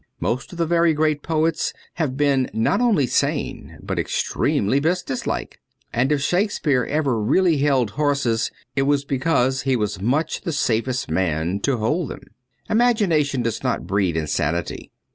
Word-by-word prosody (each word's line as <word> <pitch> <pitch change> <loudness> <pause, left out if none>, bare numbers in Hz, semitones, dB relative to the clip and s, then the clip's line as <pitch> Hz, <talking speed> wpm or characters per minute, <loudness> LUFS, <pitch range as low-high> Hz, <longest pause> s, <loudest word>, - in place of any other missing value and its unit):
Most 125 +3 -2
of 175 - -9
the 170 - +1
very 170 -1 +3
great 155 -1 +1
poets 160 0 0 0.2
have 145 -6 -2
been 140 -3 +2
not 185 - +2
only 215 - +3
sane, - - -2
but - - -3
extremely 115 +8 0
business 160 -3 -1
like; - - -3 0.3
and 130 +4 +1
if 145 -2 +1
Shakespeare 175 - +1
ever 140 -7 0
really 165 - +3
held 135 -6 +2
horses, 140 -5 0 0.3
it 140 - +2
was 140 -1 +2
because 130 -2 +1
he 130 +1 +1
was 105 -5 -2
much 140 +9 0
the 170 -4 -3
safest 130 0 0
man 85 +1 0
to 130 +4 0
hold 140 +8 -1
them. - - -8 0.5
Imagination 185 - +2
does 115 -1 -2
not 125 -3 -1
breed 95 -4 0
insanity. 80 +1 -2
140 Hz, 155 wpm, -22 LUFS, 115-160 Hz, 0.5 s, very